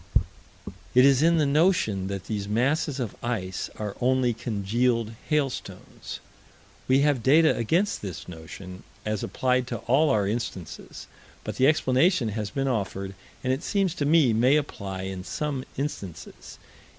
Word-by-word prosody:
It 125 Hz, +1 st, +8 dB
is 135 Hz, -1 st, +5 dB
in 165 Hz, +1 st, +4 dB
the 155 Hz, -, +3 dB
notion 140 Hz, -, +2 dB
that 100 Hz, -1 st, -4 dB
these 105 Hz, -2 st, -3 dB
masses 135 Hz, +6 st, 0 dB
of 120 Hz, -6 st, -3 dB
ice 95 Hz, -6 st, -3 dB
are 105 Hz, -2 st, -4 dB
only 125 Hz, -1 st, +2 dB
congealed 115 Hz, +2 st, 0 dB, 0.2 s
hailstones. 145 Hz, -4 st, -3 dB, 0.7 s
We 130 Hz, +1 st, +4 dB
have 145 Hz, -4 st, +2 dB
data 155 Hz, +6 st, +5 dB
against 170 Hz, -, +1 dB
this 95 Hz, -6 st, -6 dB
notion, 90 Hz, +2 st, -9 dB, 0.2 s
as 105 Hz, -1 st, -1 dB
applied 125 Hz, -1 st, 0 dB
to 120 Hz, -, -3 dB
all 145 Hz, +6 st, +4 dB
our 105 Hz, -7 st, +2 dB
instances, 100 Hz, -7 st, -5 dB, 0.4 s
but -, -, -5 dB
the 130 Hz, -, +5 dB
explanation 145 Hz, -, +3 dB
has 105 Hz, -1 st, -3 dB
been 135 Hz, +5 st, -2 dB
offered, 100 Hz, -5 st, -2 dB, 0.3 s
and, 130 Hz, 0 st, +1 dB
it 135 Hz, -, -3 dB
seems 195 Hz, -2 st, 0 dB
to 150 Hz, -, -2 dB
me, 150 Hz, -6 st, +5 dB
may 125 Hz, +6 st, +4 dB
apply 100 Hz, -10 st, -3 dB
in 95 Hz, -1 st, -5 dB
some 140 Hz, +4 st, -3 dB
instances. 100 Hz, -, -6 dB
125 Hz, 150 wpm, -26 LUFS, 100-145 Hz, 0.7 s, It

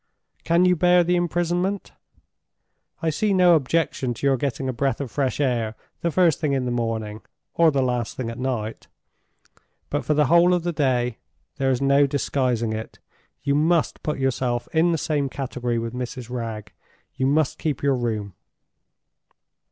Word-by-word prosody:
Can 170 Hz, +2 st, +3 dB
you 180 Hz, 0 st, +4 dB
bear 180 Hz, +1 st, +4 dB
the 175 Hz, +1 st, +1 dB
imprisonment? 175 Hz, +3 st, -1 dB, 1.1 s
I 160 Hz, -, +2 dB
see 200 Hz, +5 st, +1 dB
no 180 Hz, -2 st, +6 dB
objection 135 Hz, -4 st, 0 dB
to 140 Hz, -, -5 dB
your 135 Hz, -1 st, +4 dB
getting 130 Hz, 0 st, -2 dB
a 130 Hz, -, -1 dB
breath 135 Hz, +3 st, -1 dB
of 135 Hz, -5 st, -5 dB
fresh 135 Hz, -2 st, -1 dB
air 120 Hz, -5 st, 0 dB, 0.2 s
the 170 Hz, -, 0 dB
first 170 Hz, -2 st, +3 dB
thing 150 Hz, -3 st, 0 dB
in 130 Hz, -2 st, 0 dB
the 125 Hz, -, -1 dB
morning, 110 Hz, -3 st, -3 dB, 0.3 s
or 170 Hz, -1 st, +5 dB
the 140 Hz, -3 st, +1 dB
last 125 Hz, -2 st, -2 dB
thing 125 Hz, -, -3 dB
at 115 Hz, -, -9 dB
night. 120 Hz, -4 st, -3 dB, 1.0 s
But -, -, -1 dB
for 150 Hz, -, +1 dB
the 150 Hz, 0 st, +4 dB
whole 170 Hz, +4 st, +5 dB
of 175 Hz, -, -2 dB
the 175 Hz, 0 st, -1 dB
day, 125 Hz, -6 st, 0 dB, 0.4 s
there 135 Hz, -1 st, +1 dB
is 130 Hz, +1 st, 0 dB
no 140 Hz, +1 st, +4 dB
disguising 125 Hz, -4 st, 0 dB
it, 110 Hz, +1 st, -6 dB, 0.5 s
you 140 Hz, -1 st, +1 dB
must 160 Hz, +3 st, +1 dB
put 150 Hz, -, -2 dB
yourself 125 Hz, -2 st, -1 dB
in 165 Hz, +2 st, +3 dB
the 165 Hz, -, +1 dB
same 145 Hz, -2 st, -1 dB
category 125 Hz, -3 st, -3 dB
with 115 Hz, 0 st, -3 dB
Mrs. 125 Hz, -1 st, -6 dB
Wragge—you 115 Hz, +2 st, -6 dB
must 145 Hz, 0 st, +1 dB
keep 150 Hz, -4 st, -2 dB
your 140 Hz, -1 st, +3 dB
room." 110 Hz, -5 st, -3 dB
135 Hz, 170 wpm, -23 LUFS, 120-160 Hz, 1.1 s, no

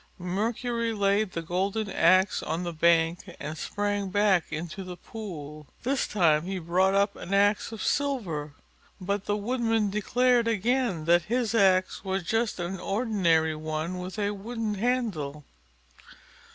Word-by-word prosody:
Mercury 230 Hz, +5 st, -1 dB
laid 200 Hz, -1 st, +1 dB
the 165 Hz, -, -3 dB
golden 195 Hz, +6 st, -1 dB
axe 185 Hz, +1 st, +3 dB
on 165 Hz, +3 st, -3 dB
the 175 Hz, -1 st, -4 dB
bank 165 Hz, +1 st, +3 dB, 0.2 s
and 150 Hz, +2 st, -5 dB
sprang 205 Hz, +3 st, -2 dB
back 200 Hz, -3 st, +3 dB
into 165 Hz, +4 st, -5 dB
the 180 Hz, -1 st, -8 dB
pool. 155 Hz, -9 st, -8 dB, 0.2 s
This 265 Hz, +1 st, 0 dB
time 165 Hz, -6 st, +3 dB
he 190 Hz, +1 st, -3 dB
brought 185 Hz, +3 st, +2 dB
up 200 Hz, +1 st, +2 dB
an 195 Hz, -, -3 dB
axe 205 Hz, +2 st, +2 dB
of 225 Hz, -, -6 dB
silver, 180 Hz, -, -1 dB, 0.4 s
but 200 Hz, +1 st, -2 dB
the 205 Hz, -, 0 dB
Woodman 225 Hz, -1 st, 0 dB
declared 240 Hz, +3 st, +2 dB
again 230 Hz, -5 st, 0 dB
that 170 Hz, 0 st, +4 dB
his 235 Hz, -1 st, 0 dB
axe 190 Hz, -4 st, +3 dB
was 190 Hz, -1 st, -2 dB
just 225 Hz, +3 st, -1 dB
an 175 Hz, +2 st, -3 dB
ordinary 185 Hz, -8 st, +1 dB
one 155 Hz, +3 st, -3 dB
with 180 Hz, +3 st, -6 dB
a 205 Hz, -1 st, 0 dB
wooden 220 Hz, +2 st, -4 dB
handle. 195 Hz, -, -2 dB
195 Hz, 145 wpm, -27 LUFS, 170-220 Hz, 0.4 s, that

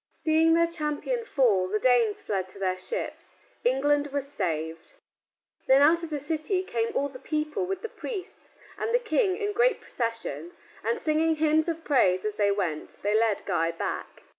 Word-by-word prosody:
Seeing 320 Hz, +1 st, +3 dB
their 335 Hz, 0 st, +4 dB
champion 335 Hz, +9 st, -2 dB
fall, 220 Hz, -, +2 dB
the 210 Hz, +3 st, 0 dB
Danes 235 Hz, -3 st, +2 dB
fled 190 Hz, -3 st, -2 dB
to 185 Hz, -, -7 dB
their 185 Hz, -1 st, -1 dB
ships. 475 Hz, -, -5 dB, 0.3 s
England 285 Hz, +3 st, +2 dB
was 280 Hz, -1 st, -2 dB
saved. 160 Hz, -, -3 dB, 0.7 s
Then 270 Hz, +2 st, +6 dB
out 330 Hz, +3 st, +5 dB
of 330 Hz, -, -5 dB
the 300 Hz, -2 st, -2 dB
city 320 Hz, +6 st, -1 dB
came 230 Hz, -10 st, -1 dB
all 280 Hz, -, +1 dB
the 265 Hz, -2 st, -11 dB
people 305 Hz, +6 st, -2 dB
with 385 Hz, +1 st, -4 dB
the -, -, -2 dB
priests 400 Hz, -5 st, -8 dB, 0.2 s
and 460 Hz, +2 st, +2 dB
King 405 Hz, -4 st, +2 dB
in 415 Hz, -1 st, -2 dB
great 485 Hz, +3 st, +3 dB
procession, 230 Hz, +8 st, -4 dB, 0.3 s
and 465 Hz, 0 st, 0 dB
singing 320 Hz, -1 st, +2 dB
hymns 310 Hz, +1 st, +2 dB
of 330 Hz, 0 st, -4 dB
praise 190 Hz, -11 st, +3 dB
as 215 Hz, -, -1 dB
they 205 Hz, -1 st, +2 dB
went, 180 Hz, -7 st, -2 dB
they 205 Hz, +1 st, +1 dB
led 220 Hz, -2 st, +2 dB
Guy 165 Hz, -3 st, +1 dB
back. 165 Hz, -, -5 dB
290 Hz, 175 wpm, -27 LUFS, 210-335 Hz, 0.7 s, Then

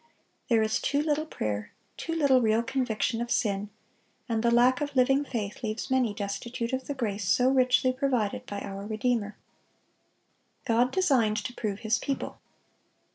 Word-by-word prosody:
There 225 Hz, -2 st, +4 dB
is 220 Hz, 0 st, 0 dB
too 285 Hz, +1 st, +1 dB
little 305 Hz, 0 st, 0 dB
prayer, 105 Hz, -, -4 dB, 0.2 s
too 330 Hz, -, -4 dB
little 280 Hz, -5 st, +4 dB
real 225 Hz, 0 st, +2 dB
conviction 245 Hz, -2 st, -1 dB
of 240 Hz, -, -3 dB
sin, 205 Hz, -3 st, 0 dB, 0.6 s
and 225 Hz, -2 st, 0 dB
the 235 Hz, -, +3 dB
lack 245 Hz, +3 st, +4 dB
of 290 Hz, -1 st, -3 dB
living 270 Hz, +2 st, +4 dB
faith 220 Hz, -7 st, -4 dB
leaves 220 Hz, +2 st, -4 dB
many 255 Hz, -4 st, +2 dB
destitute 230 Hz, +4 st, -4 dB
of 260 Hz, 0 st, -2 dB
the 285 Hz, -, -3 dB
grace 210 Hz, -6 st, -2 dB
so 250 Hz, +5 st, +4 dB
richly 255 Hz, -1 st, +3 dB
provided 255 Hz, -6 st, -1 dB
by 205 Hz, 0 st, -5 dB
our 195 Hz, +1 st, -6 dB
Redeemer. 215 Hz, -1 st, -1 dB, 1.3 s
God 240 Hz, 0 st, +3 dB
designed 255 Hz, -, +2 dB
to 245 Hz, -, -5 dB
prove 210 Hz, -4 st, -4 dB
His 220 Hz, +1 st, +1 dB
people. 275 Hz, -, -4 dB
235 Hz, 160 wpm, -28 LUFS, 215-260 Hz, 1.3 s, There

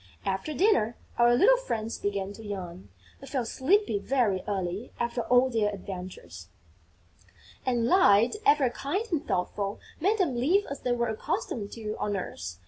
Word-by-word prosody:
After 195 Hz, +9 st, -2 dB
dinner, 355 Hz, -, +2 dB, 0.2 s
our 240 Hz, 0 st, +6 dB
little -, -, +6 dB
friends 230 Hz, -, -3 dB
began 200 Hz, -1 st, -2 dB
to 225 Hz, -, -11 dB
yawn. 185 Hz, -3 st, -7 dB, 0.3 s
They 275 Hz, -, -11 dB
felt 255 Hz, -5 st, -2 dB
sleepy 330 Hz, -, +2 dB
very 215 Hz, -5 st, +1 dB
early, 195 Hz, +3 st, -3 dB
after 235 Hz, 0 st, -1 dB
all 250 Hz, +2 st, +4 dB
their 215 Hz, -3 st, +1 dB
adventures; 180 Hz, -, -8 dB, 1.2 s
and, 240 Hz, -2 st, +2 dB
Light 235 Hz, -, +5 dB
ever 290 Hz, -, +4 dB
kind 370 Hz, -, -2 dB
and 320 Hz, -1 st, -1 dB
thoughtful 195 Hz, +2 st, -2 dB, 0.2 s
made 400 Hz, +7 st, +2 dB
them 340 Hz, -, +1 dB
live 340 Hz, +13 st, +2 dB
as 280 Hz, -, -4 dB
they 245 Hz, -, 0 dB
were 235 Hz, -1 st, 0 dB
accustomed 220 Hz, -1 st, -3 dB
to 215 Hz, -2 st, -5 dB
on 205 Hz, -1 st, -1 dB
earth. 90 Hz, -, -6 dB
230 Hz, 155 wpm, -28 LUFS, 200-275 Hz, 1.2 s, our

